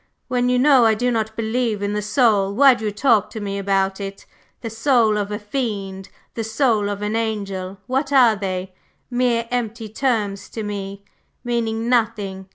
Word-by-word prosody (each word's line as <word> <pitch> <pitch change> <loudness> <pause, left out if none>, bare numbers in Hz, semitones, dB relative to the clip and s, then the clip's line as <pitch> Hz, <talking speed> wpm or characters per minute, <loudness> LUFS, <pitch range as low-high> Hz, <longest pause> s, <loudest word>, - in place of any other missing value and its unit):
"When 250 -1 +1
you 250 - +2
know 265 -1 +5
I 220 -1 +4
do 245 +3 0
not 220 -1 -2
believe 225 -2 -1
in 200 0 -1
the 210 - -1
soul, 210 -3 +2
why 270 +2 +7
do 230 -3 -5
you 210 - 0
talk 220 -1 +2
to 220 - -7
me 200 -1 -3
about 195 0 0
it? 195 0 -7 0.4
The 230 - -4
soul 225 -2 +3
of 205 -1 -2
a 210 - -2
fiend, 205 -4 -4 0.2
the 225 - -3
soul 220 -2 +1
of 205 0 -4
an 210 +1 -1
angel, 200 -4 -3
what 270 +3 -1
are 250 -5 +6
they? 190 -2 -4 0.4
Mere 245 -2 +1
empty 230 -2 -3
terms 210 -4 -1
to 220 - -5
me, 200 -1 -6 0.4
meaning 230 -2 -1
nothing. 210 -6 0
220 Hz, 180 wpm, -21 LUFS, 200-240 Hz, 0.4 s, why